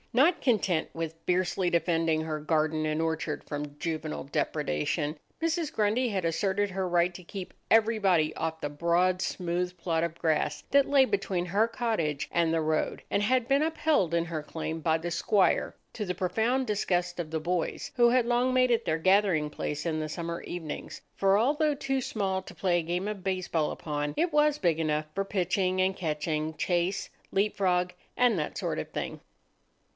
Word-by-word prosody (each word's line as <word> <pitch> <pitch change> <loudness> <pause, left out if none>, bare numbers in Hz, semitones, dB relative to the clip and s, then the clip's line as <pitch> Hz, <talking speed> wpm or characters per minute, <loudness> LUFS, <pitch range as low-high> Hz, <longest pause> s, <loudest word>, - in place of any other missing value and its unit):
Not 295 +9 +4
content 190 - +1
with 165 -1 -3
fiercely 180 0 +1
defending 165 -2 +1
her 155 -1 -3
garden 155 0 0
and 155 +1 0
orchard 160 -1 -2
from 145 0 -6
juvenile 155 - -3
depredation, 145 - -1 0.2
Mrs. 330 -1 0
Grundy 220 +4 +1
had 190 -5 -1
asserted 195 +4 0
her 190 -1 -2
right 175 0 +2
to 180 - -10
keep 185 +1 -7 0.2
everybody 205 -8 +3
off 160 0 -3
the 145 - -2
broad, 170 +4 +1
smooth 180 0 -2
plot 165 -1 0
of 170 -1 -3
grass 160 -2 0
that 280 0 +4
lay 275 -2 +6
between 195 -5 -1
her 200 +5 +2
cottage 215 - -1
and 170 -1 +2
the 165 - +2
road, 155 0 -1
and 200 - +2
had 250 +2 +2
been 275 +2 +3
upheld 310 - +1
in 170 0 +2
her 165 -2 -4
claim 160 +1 -5
by 160 0 +2
the 170 +1 -4
squire, 190 +4 +2 0.2
to 215 - -3
the 180 -2 -3
profound 225 +8 +1
disgust 180 -5 -1
of 165 -3 -3
the 160 0 -2
boys, 170 +1 -2
who 240 -2 +5
had 245 -1 +3
long 245 +2 +2
made 255 -1 +4
it 235 - +2
their 160 - +1
gathering 185 -4 +3
place 150 +1 -4
in 160 -2 0
the 155 0 -3
summer 170 +1 -4
evenings; 165 -4 -6
for 195 0 +3
although 295 +6 +2
too 270 -1 -1
small 195 -5 -1
to - - -12
play 175 -2 +1
a - - -3
game 175 +4 -2
of 210 -3 -5
baseball 185 -5 0
upon, 145 -1 -3
it 345 -2 +1
was 300 0 +4
big 170 - +1
enough 155 -1 0
for 195 - 0
pitching 185 -1 0
and 190 +1 +2
catching, 155 -2 -2
chase, 175 +2 0 0.2
leap 205 +2 +1
frog, 180 -2 +1 0.2
and 245 -5 +4
that 150 -2 -3
sort - - -2
of - - -5
thing. - - -5
180 Hz, 185 wpm, -28 LUFS, 160-210 Hz, 0.2 s, lay